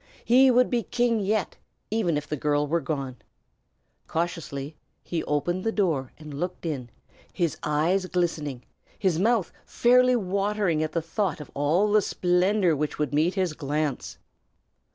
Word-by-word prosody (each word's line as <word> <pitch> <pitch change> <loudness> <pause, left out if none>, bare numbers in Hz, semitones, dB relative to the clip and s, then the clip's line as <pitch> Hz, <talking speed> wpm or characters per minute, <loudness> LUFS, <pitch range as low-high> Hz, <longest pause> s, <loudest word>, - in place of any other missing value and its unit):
He 260 +3 +6
would 250 0 +4
be 240 -1 +2
king 240 0 +1
yet, 210 0 -1 0.3
even 195 -8 +1
if 150 +1 -5
the 150 - -2
girl 145 +1 +1
were 165 +3 0
gone. 135 -5 -4 0.9
Cautiously 160 -3 -3 0.3
he 170 -2 -3
opened 175 +5 -1
the 225 - 0
door 160 - 0
and 155 -2 -10
looked 175 +5 -4
in, 135 -7 -3 0.4
his 170 -5 -1
eyes 165 +6 +1
glistening, 155 -8 -2 0.3
his 185 -5 +1
mouth 220 -1 +2
fairly 250 +1 +4
watering 200 -4 0
at 155 0 -2
the 165 - -1
thought 165 0 -1
of 150 - -10
all 165 +9 +2
the 215 0 +5
splendor 180 -1 +2
which 150 +1 -2
would 150 -2 -1
meet 160 +5 +2
his 185 -5 0
glance. 150 -1 -3
170 Hz, 155 wpm, -26 LUFS, 150-205 Hz, 0.9 s, He